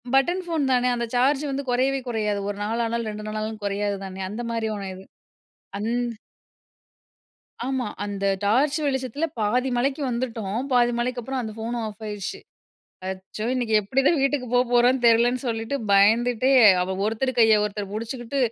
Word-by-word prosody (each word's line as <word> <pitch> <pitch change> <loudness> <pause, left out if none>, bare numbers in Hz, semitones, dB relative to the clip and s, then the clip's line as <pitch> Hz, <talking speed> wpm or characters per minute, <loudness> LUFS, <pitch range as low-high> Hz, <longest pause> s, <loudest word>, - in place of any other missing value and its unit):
Button 350 +8 +2
phone 325 -3 0
தான, 245 - +2
அந்த 235 - -1
charge 270 +4 +3
வந்து 275 +1 -2
குறையவே 265 +2 +1
குறையாது 210 -3 -1
1 205 - -4
நாளானாலும் 230 +1 -1
2 210 0 -7
நாளானாலும் 215 0 -4
குறையாது 200 0 -1
தானே. 190 0 -7
அந்த 215 +4 -5
மாரி 230 -1 -1
ஒன்னு 195 -2 -5
இது. 190 - -11 0.7
அந் 210 +3 -2 1.8
ஆமா 260 -3 -1 0.2
அந்த 200 -1 -3 0.2
டார்ச் 270 +9 +3
வெளிச்சத்தில 265 +2 -1
பாதி 245 +5 +1
மலைக்கு 270 +4 0
வந்துட்டோம், 230 -4 -3
பாதி 240 -1 +4
மலைக்கப்பறம் 250 +1 -2
அந்த 220 -2 -6
போனும் 230 +1 -3
ஆஃப் 215 +1 -10
ஆயிடுச்சு. 205 -2 -5 0.7
அச்சோ 190 +3 -6
இன்னைக்கு 240 -3 -1
எப்படி 230 +7 0
தான் 335 - +4
வீட்டுக்கு 275 -1 +1
போப்போறோனு 245 +1 +3
தெரியலனு 235 +2 +4
சொல்லிட்டு, 225 +2 -2 0.2
பயந்துட்டே 230 +5 +4 0.3
அவ 190 +1 -2
ஒருத்தர் 225 +5 0
கையை 220 -2 +6
ஒருத்தர் 205 -1 -4
புடிச்சுக்கிட்டு 235 +4 -4
235 Hz, 150 wpm, -24 LUFS, 210-255 Hz, 1.8 s, கையை